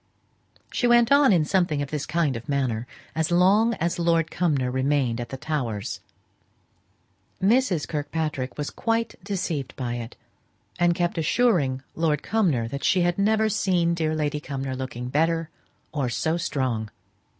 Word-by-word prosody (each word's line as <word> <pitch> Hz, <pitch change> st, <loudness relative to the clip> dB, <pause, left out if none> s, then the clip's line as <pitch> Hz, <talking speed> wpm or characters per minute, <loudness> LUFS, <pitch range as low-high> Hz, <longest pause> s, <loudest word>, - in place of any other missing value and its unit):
She 245 Hz, -, +1 dB
went 240 Hz, 0 st, +5 dB
on 280 Hz, -3 st, +6 dB
in 170 Hz, -5 st, +3 dB
something 175 Hz, -4 st, +1 dB
of 140 Hz, -, -8 dB
this 150 Hz, -2 st, -3 dB
kind 160 Hz, -5 st, +1 dB
of 115 Hz, +3 st, -8 dB
manner 125 Hz, -4 st, -1 dB, 0.3 s
as 160 Hz, 0 st, 0 dB
long 200 Hz, +6 st, +4 dB
as 175 Hz, +1 st, -2 dB
Lord 165 Hz, -1 st, +2 dB
Cumnor 145 Hz, -8 st, 0 dB
remained 130 Hz, -2 st, 0 dB
at 120 Hz, -, -6 dB
the 135 Hz, -, -5 dB
Towers. 130 Hz, -9 st, -3 dB, 1.4 s
Mrs. 195 Hz, -, +2 dB
Kirkpatrick 150 Hz, -3 st, -3 dB
was 145 Hz, -1 st, -3 dB
quite 230 Hz, 0 st, -1 dB
deceived 170 Hz, -, -3 dB
by 120 Hz, -2 st, -3 dB
it, 115 Hz, 0 st, -7 dB, 0.6 s
and 175 Hz, 0 st, +3 dB
kept 175 Hz, -1 st, -1 dB
assuring 155 Hz, -, +2 dB
Lord 155 Hz, -3 st, 0 dB
Cumnor 165 Hz, -, +1 dB
that 140 Hz, +3 st, -5 dB
she 185 Hz, -, +3 dB
had 175 Hz, +1 st, +1 dB
never 220 Hz, +2 st, +3 dB
seen 180 Hz, -5 st, +1 dB
dear 160 Hz, -2 st, 0 dB
Lady 150 Hz, -1 st, -1 dB
Cumnor 135 Hz, -2 st, -4 dB
looking 125 Hz, -1 st, -5 dB
better, 165 Hz, +3 st, +1 dB, 0.4 s
or 140 Hz, -5 st, -1 dB
so 160 Hz, +7 st, 0 dB
strong. 130 Hz, -, -2 dB
155 Hz, 150 wpm, -25 LUFS, 135-180 Hz, 1.4 s, on